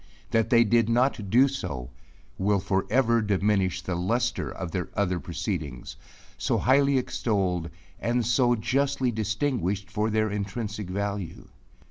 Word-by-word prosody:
That 115 0 +2
they 120 -1 +6
did 115 0 +2
not 120 -3 +1
do 125 +6 +6
so, 70 - -5 0.5
will 100 +1 +2
for 95 0 -1
ever 115 -1 +3
diminish 100 -3 +1
the 95 - -3
luster 115 +8 -1
of 90 -3 -6
their 90 -1 -3
other 90 -3 0
proceedings, 85 - -4 0.4
so - - +1
highly 140 +1 +3
extolled, 95 -9 -1 0.3
and 120 0 0
so 120 +1 +3
justly 135 +2 0
distinguished 110 - -1
for 105 +1 0
their 110 -1 +1
intrinsic 105 0 -4
value. 100 -2 -4
105 Hz, 135 wpm, -26 LUFS, 95-120 Hz, 0.5 s, they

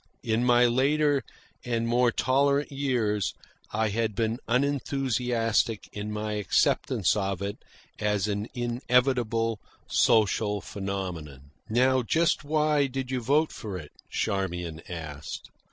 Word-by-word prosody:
In 115 +2 +1
my 120 0 +5
later 140 +4 +3 0.4
and 115 -1 -1
more 120 +1 +3
tolerant 140 +3 +2
years 120 -8 0 0.4
I 110 0 +1
had 110 0 -1
been 115 +2 0
unenthusiastic 125 -4 0
in 105 +1 -4
my 105 0 -3
acceptance 105 -2 +2
of 95 -2 -1
it 100 +1 -3 0.4
as 105 -1 +1
an 105 +1 -2
inevitable 120 -2 +1 0.3
social 105 -1 +3
phenomenon. 90 -9 -6 0.2
"Now 130 +3 +3
just 160 +7 +1
why 150 -1 +2
did 130 0 -4
you 130 -1 -1
vote 145 +6 +2
for 100 -4 -6
it?" 75 -4 -10 0.2
Charmian 90 -4 -2
asked. 80 -4 -7
115 Hz, 120 wpm, -27 LUFS, 105-130 Hz, 0.4 s, my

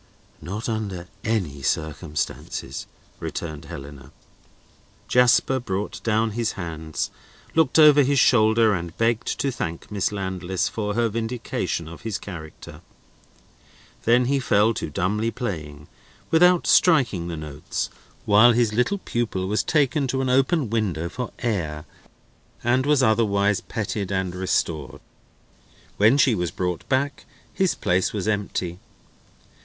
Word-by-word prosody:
"Not 100 +8 -5
under 100 -6 -3 0.2
any 90 -11 -1
circumstances," 75 -2 -3 0.3
returned 75 -3 -5
Helena. 70 0 -10 1.0
Jasper 125 +1 +4
brought 100 -3 -4
down 110 0 +1
his 115 0 -1
hands, 80 -4 -4 0.4
looked 160 0 +3
over 150 -2 +8
his 140 +1 +2
shoulder, 110 -3 +4
and 85 -2 -4
begged 115 0 +1
to 140 - 0
thank 85 -7 -5
Miss 100 -1 0
Landless 95 -2 -2
for 105 -2 -3
her 120 0 +2
vindication 115 -6 -3
of 85 +1 -10
his 110 -3 -3
character. 80 -5 -10 1.2
Then 120 +2 +4
he 140 +2 +1
fell 110 -3 +3
to - - -4
dumbly 105 +9 0
playing, 80 - -5 0.4
without 180 +2 +5
striking 120 - +4
the 85 -2 -4
notes, 75 -1 -4 0.3
while 110 +4 +6
his 115 -2 +2
little 125 - +1
pupil 120 - -2
was 105 +2 +1
taken 145 -2 +1
to 130 +1 -1
an 130 - -1
open 135 - +2
window 90 -8 -1
for 125 +5 -5
air, 80 -10 -2 0.8
and 130 +3 +2
was 145 -3 +4
otherwise 105 -3 +2
petted 105 -3 -4
and 95 -2 -1
restored. 85 -5 -2 1.0
When 110 +7 +5
she 135 -3 +4
was 90 -5 -1
brought 90 +2 -3
back, 140 +1 0 0.3
his 190 -2 +1
place 90 +1 0
was 105 -2 -3
empty. 100 -4 -2
105 Hz, 130 wpm, -24 LUFS, 90-120 Hz, 1.2 s, over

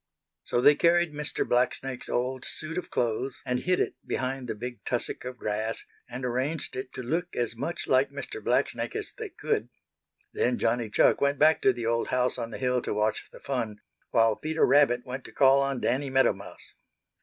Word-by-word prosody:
So 120 - 0
they 145 - +8
carried 170 0 +3
Mr. 150 0 -1
Blacksnake's 125 +1 0
old 130 +1 -1
suit 155 +1 -5
of - - -9
clothes 125 +3 -1
and 125 0 0
hid 180 +6 +1
it - - 0
behind 130 0 -3
the 115 - -3
big 120 +3 -7
tussock 120 0 -2
of 125 0 -6
grass, 110 +1 -2 0.2
and 125 +1 -5
arranged 130 +5 -2
it 130 0 -5
to 130 - -5
look 170 +8 -2
as 120 -1 -1
much 140 +9 -3
like 130 +1 +4
Mr. 140 - -7
Blacksnake - - 0
as 425 -1 -4
they 445 -3 -6
could. 440 +3 -2 0.6
Then 430 - +1
Johnny 120 - 0
Chuck - - +4
went 140 0 +2
back 155 +1 +5
to 130 - +5
the 120 -2 -5
old 115 0 +1
house 125 0 +1
on 115 -1 -3
the - - -6
hill 125 -1 +1
to - - -3
watch 105 +1 0
the - - -13
fun, 115 -6 -3 0.3
while 115 -2 +4
Peter 160 +5 +1
Rabbit 125 -4 +4
went 130 +1 -5
to - - -9
call 135 0 +5
on 135 -2 -1
Danny 135 +2 0
Meadow 130 -3 +4
Mouse. 100 +1 -12
130 Hz, 200 wpm, -28 LUFS, 120-145 Hz, 0.6 s, they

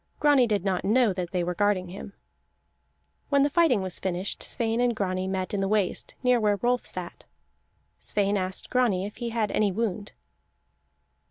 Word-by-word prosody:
Grani 285 -4 +4
did 205 -3 -1
not 190 -2 0
know 225 0 +3
that 180 -2 -4
they 180 -1 -1
were 180 +1 -2
guarding 190 -1 0
him. 195 +2 -9 1.2
When 280 -1 +4
the 285 - +1
fighting 290 - +3
was 185 -1 -2
finished, 185 +1 -2
Sweyn 225 0 -1
and 245 -1 +2
Grani 185 -2 -2
met 190 0 -3
in 200 - 0
the 195 - 0
waist, 205 -2 -1
near 250 -1 +4
where 210 -2 +2
Rolf 245 0 +1
sat. - - -7 0.7
Sweyn 205 0 0
asked 185 -1 -2
Grani 225 -7 +2
if 205 - -8
he 235 -1 -3
had 225 -2 -1
any 210 -2 +2
wound. 210 0 -3
205 Hz, 175 wpm, -26 LUFS, 185-235 Hz, 1.2 s, Grani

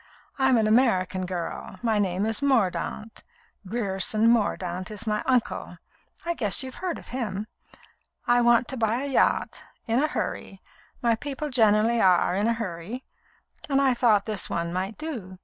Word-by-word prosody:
I'm 265 -2 +4
an 220 - +2
American 190 -5 +2
girl; 180 +1 -5
my 220 -3 +1
name 190 0 0
is 225 +4 0
Mordaunt. 225 -4 -1 0.4
Grierson 215 0 +2
Mordaunt 185 -5 -1
is 215 +1 -6
my 210 -1 -1
uncle. 250 -3 -1 0.5
I 340 - 0
guess 220 - +3
you've 260 0 -7
heard 365 -3 -2
of - - -13
him. 215 -5 -3 0.8
I 245 0 +3
want 240 0 +4
to 265 - -4
buy 230 +3 0
a - - -3
yacht, 275 - +1 0.2
in 230 +3 +1
a 305 - +2
hurry 195 -9 -4 0.4
my 235 -1 +3
people 285 +5 -4
generally 225 -1 +3
are 180 -1 +3
in 205 +3 +1
a 230 - +2
hurry 215 +2 -6 0.6
and 275 -1 +2
I 270 -2 +3
thought 225 -4 +3
this 215 -4 -2
one 170 0 -2
might 190 +4 -3
do. 230 -13 -7
225 Hz, 165 wpm, -25 LUFS, 195-250 Hz, 0.8 s, I'm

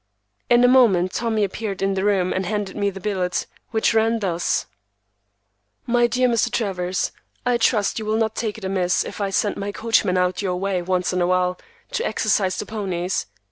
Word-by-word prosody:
In 240 0 +5
a - - +7
moment 215 -9 +4
Tommy 225 -3 0
appeared 200 0 -3
in 195 0 +1
the 190 0 -1
room 195 -3 +2
and 190 - -1
handed 205 -1 -2
me 200 -1 +1
the 195 0 -8
billet, 185 -2 -1 0.2
which 220 0 +1
ran 225 +1 +3
thus:— 175 -5 -1 1.2
MY 240 0 +3
DEAR 255 +1 +2
MR. 235 0 +1
TRAVERS,—I 195 +4 -2
trust 225 -2 +1
you 215 - -5
will 215 +1 0
not 220 -1 0
take 220 -2 -3
it 210 - -8
amiss 185 -2 +1
if - - -7
I 200 - 0
send 200 +2 0
my 200 +1 -3
coachman 215 -4 +1
out 180 +1 +1
your 185 -3 -1
way 190 0 -1
once 180 0 0
in 180 - 0
a 175 - +2
while 180 0 +1 0.3
to - - -1
exercise 190 - +1
the - - -3
ponies. 190 - -2
200 Hz, 190 wpm, -22 LUFS, 185-225 Hz, 1.2 s, a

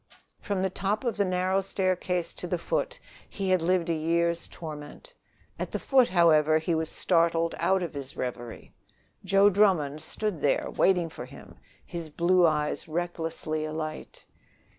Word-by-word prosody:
From 200 -3 -2
the 190 - 0
top 200 +4 -1
of 235 -4 -1
the 200 - +2
narrow 185 +1 +1
staircase 185 -2 -1
to - - -6
the - - -1
foot, - - -2
and - - -24 0.2
he 195 -2 -3
had 185 -2 +3
lived 180 0 +1
a 170 - +1
year's 170 +1 0
torment! 155 - -9 0.5
At - - -3
the - - -3
foot, 260 -3 +3
however, 155 -3 +4
he 160 +2 -1
was 160 0 -1
startled 165 -1 +1
out 190 -1 +2
of 170 - -5
his 140 -2 -7
reverie. 120 -2 -6 0.5
Joe 195 +1 +5
Drummond 175 -8 +2
stood 195 +1 -3
there 145 - +1
waiting 180 -3 +2
for 125 - -8
him, 135 +2 -13 0.3
his 170 -2 -6
blue 175 +3 +3
eyes 150 0 -1
recklessly 165 -2 -3
alight. 155 0 -5
170 Hz, 160 wpm, -27 LUFS, 155-190 Hz, 0.5 s, Joe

